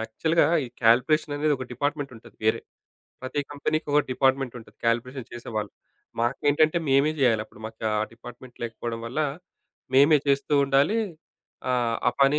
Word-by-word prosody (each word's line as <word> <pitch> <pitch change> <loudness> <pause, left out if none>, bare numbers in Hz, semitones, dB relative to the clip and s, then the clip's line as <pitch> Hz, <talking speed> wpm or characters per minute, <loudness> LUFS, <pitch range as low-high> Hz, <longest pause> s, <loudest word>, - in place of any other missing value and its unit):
యాక్చువల్‌గా 160 +9 +1 0.2
ఈ - - -6 0.2
కాలిక్యులేషన్ 135 +6 +3
అనేది 150 0 +2
ఒక 130 - -5
డిపార్ట్మెంట్ 145 0 -2
ఉంటది 110 - -16
వేరే. 110 - +2 0.6
ప్రతి 130 +3 -2
కంపెనీకొక 150 0 0
డిపార్ట్మెంట్ 135 -1 +1
ఉంటది 105 -1 -18
కాలిక్యులేషన్ 125 +2 -1
చేసేవాళ్ళు. 110 -3 -5 0.5
మాకేంటంటే, 145 +6 +2
మేమే 140 +3 +4
జేయాలి. 115 -4 +3
అప్పుడు 110 - -18
మాకు 110 0 -9
ఆ - - +1
డిపార్ట్మెంట్ 120 +1 -12
లేకపోవడం 115 0 -5
వల్ల 130 +7 -2 0.7
మేమే 145 +3 +7
చేస్తూ 140 +1 +1
ఉండాలి 140 +10 +3 0.7
ఆహ్, 120 -2 +1
ఆ - - +3
పని 140 +2 +5
130 Hz, 140 wpm, -26 LUFS, 115-145 Hz, 0.7 s, మేమే